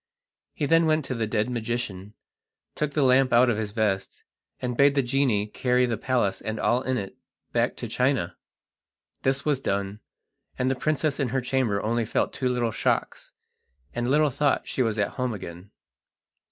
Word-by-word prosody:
He 150 - -1
then 165 +2 +4
went 155 -2 +2
to 130 - -3
the 115 -3 -1
dead 105 +1 0
magician, 110 -4 -4 0.6
took 150 -1 -2
the 150 - +2
lamp 130 0 +4
out 120 +1 +5
of 110 - -1
his 105 -2 -3
vest, 105 -3 -1 0.4
and 125 -1 -3
bade 140 +2 +4
the 140 - +3
genie 120 -5 +1
carry 125 +3 +1
the 120 -2 -1
palace 120 -4 0
and 110 0 -4
all 125 +1 +2
in 130 -1 -1
it 100 -3 -5 0.4
back - - +1
to - - -5
China. 125 -8 0 0.9
This 135 +1 0
was 145 -3 +2
done, 100 -3 -2 0.6
and 130 +1 +1
the - - 0
princess 150 +2 0
in 135 -4 0
her 130 +3 0
chamber 125 -5 0
only 115 +1 0
felt - - 0
two 130 -2 -1
little 120 -2 0
shocks, - - -1 0.6
and 120 +1 -1
little 150 +1 +3
thought 145 +2 +1
she - - -1
was 110 -3 0
at 100 - +1
home 125 -3 -1
again. 90 0 -9
125 Hz, 180 wpm, -26 LUFS, 110-135 Hz, 0.9 s, out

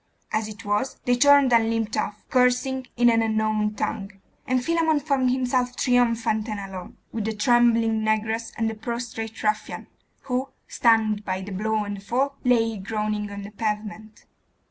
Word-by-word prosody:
As 215 0 0
it 215 +1 -10
was, 205 +6 -1
they 245 - +3
turned 280 0 +5
and 225 -1 +4
limped 225 -1 -1
off, 210 0 -3
cursing 250 +1 +2
in 240 0 +4
an 225 0 +3
unknown 215 -1 0
tongue; 205 -1 -3 0.4
and 255 0 0
Philammon 325 -2 +2
found 275 -3 +1
himself 250 -1 0
triumphant 230 -3 +1
and 210 -1 -3
alone, 190 -2 -8
with 220 -2 -3
the 220 - -1
trembling 230 0 +3
negress 220 +1 -1
and 225 - 0
the 225 - -2
prostrate 225 0 -5
ruffian, 215 0 -1 0.4
who, 260 0 -2 0.2
stunned 220 -3 +2
by 185 -1 -3
the 200 +2 -7
blow 215 +2 -1
and 205 0 -5
the - - -10
fall, 265 +7 -1
lay 225 -3 +2
groaning 210 +1 -3
on 200 0 -7
the 200 - -9
pavement. 215 0 -5
225 Hz, 165 wpm, -24 LUFS, 210-245 Hz, 0.4 s, turned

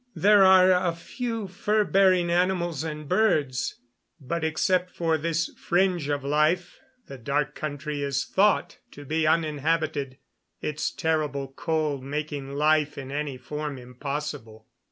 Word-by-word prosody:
There 205 0 +5
are 185 0 +7
a 180 -2 +2
few 225 +4 -4
fur 210 +3 +1
bearing 185 -3 +3
animals 175 -3 0
and 150 -2 -6
birds, 150 - +1 0.4
but 160 +4 -3
except 180 +3 +1
for 165 -2 0
this 165 +1 -1
fringe 175 -4 0
of 145 -1 -1
life 155 +5 +1 0.3
the 135 - -10
Dark 145 +4 -1
Country 145 -1 -4
is 140 -1 -1
thought 205 +2 +1
to 145 - -11
be 155 +2 0
uninhabited, 155 -3 0 0.4
its 150 0 -2
terrible 150 -4 -1
cold 150 -1 -2
making 145 -1 -4
life 150 0 +2
in 135 -1 -7
any 145 -2 -3
form 150 +2 -5
impossible. 125 -3 -6
155 Hz, 135 wpm, -26 LUFS, 140-175 Hz, 0.4 s, are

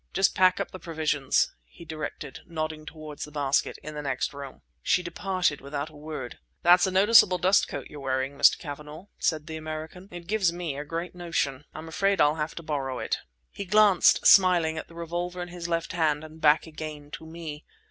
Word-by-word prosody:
"Just 195 - +3
pack 185 0 +4
up 200 - -3
the 185 - -8
provisions," 155 -5 0
he 65 - -15
directed, 155 -3 -6
nodding 155 -2 -4
toward 155 -1 -9
the - - -5
basket—"in 145 +1 -1
the 150 - -5
next 135 0 -2
room." 140 -2 -9 0.2
She 185 0 +2
departed 180 -2 -1
without 140 +2 -5
a - - -17
word. 150 -4 -7 0.2
"That's 175 +2 +6
a - - -1
noticeable 190 -1 +6
dust 185 +2 +3
coat - - -6
you're 150 - -10
wearing, 130 0 -2
Mr. - - +5
Cavanagh," 150 +4 -9
said 155 -3 0
the 160 -1 -6
American; 155 +4 -7
"it 175 -1 -9
gives 195 -2 +1
me 170 -4 -4
a 145 - -4
great 165 +4 -5
notion. 165 -6 -2
I'm 155 +1 -7
afraid 195 +4 +1
I'll 150 - +5
have 150 0 -3
to 170 - -7
borrow 140 -4 -3
it." - - -2 0.3
He 200 - -6
glanced, 205 -1 +5
smiling, 175 -4 +6
at - - -8
the 165 - -16
revolver 175 +2 -4
in 175 0 -5
his 175 -1 -6
left 165 -1 -1
hand 155 -3 +1
and 155 0 -12
back 150 0 +4
again 155 -2 -8
to 160 - -8
me. 160 -2 -8
160 Hz, 200 wpm, -27 LUFS, 150-175 Hz, 0.3 s, That's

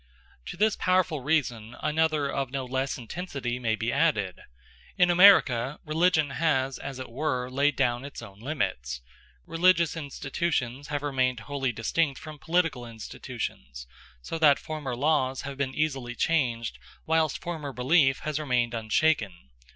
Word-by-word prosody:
To - - -7
this 215 +2 +3
powerful 185 -5 +1
reason 125 -6 -1
another 155 -1 +1
of 135 -1 -2
no 135 0 -3
less 130 +2 -2
intensity 125 -2 -4
may 115 -3 0
be 115 +2 -2
added: 105 - +1 0.6
in 180 0 +5
American 150 -9 +6
religion 155 -2 +2
has, 135 -4 0
as 140 -1 -6
it 130 - -6
were, 130 -1 -2
laid 140 +2 +2
down 120 -2 +1
its 140 - -8
own 100 -4 -11
limits. 65 - -3 0.4
Religious 170 -1 +3
institutions 140 -3 -3
have 145 -1 -3
remained 130 -4 0
wholly 135 0 -2
distinct 135 +6 0
from 155 -1 -10
political 165 -6 0
institutions, 65 - -7 0.4
so 165 - -4
that 150 -3 +6
former 150 -5 -5
laws 135 -1 +1
have 140 0 -5
been 130 -1 -2
easily 135 -6 -1
changed 115 - 0 0.3
whilst 160 -2 +2
former 160 -5 -5
belief 135 +2 +3
has 155 -1 -2
remained 125 -5 0
unshaken. 110 - 0
140 Hz, 145 wpm, -27 LUFS, 120-155 Hz, 0.6 s, American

